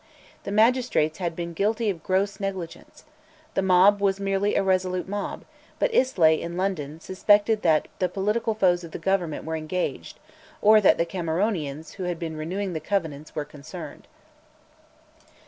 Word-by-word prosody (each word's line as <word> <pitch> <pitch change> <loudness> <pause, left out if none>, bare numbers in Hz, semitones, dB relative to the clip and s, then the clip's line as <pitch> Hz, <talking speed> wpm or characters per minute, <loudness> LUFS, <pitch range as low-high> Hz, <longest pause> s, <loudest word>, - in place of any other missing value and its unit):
The - - -4
magistrates 220 -8 +2
had 170 -3 -2
been 170 0 -5
guilty 215 +5 0
of 170 -4 -8
gross 195 +3 0
negligence. 190 -4 -6 0.5
The - - +1
mob 190 +2 +5
was 195 -1 +1
merely 195 +1 0
a - - +2
resolute 185 -1 0
mob; 205 +1 -4 0.3
but - - 0
Islay, 170 - +3
in 170 +1 -5
London, 165 -6 -2
suspected 205 +4 +2
that 160 -3 +2
the 185 - +1
political 210 +4 -1
foes 180 -4 +2
of 165 - -10
the - - -3
Government 180 -5 -1
were 160 0 -3
engaged, 160 +3 -4 0.4
or 215 +1 +6
that 195 - +5
the 170 - +1
Cameronians, 165 -3 -2
who 185 - -4
had 175 -1 -2
been 160 -1 -5
renewing 180 +5 -3
the 160 - -2
Covenants, 155 -6 -3
were 150 - -2
concerned. 150 +2 -10
185 Hz, 160 wpm, -25 LUFS, 165-200 Hz, 0.5 s, or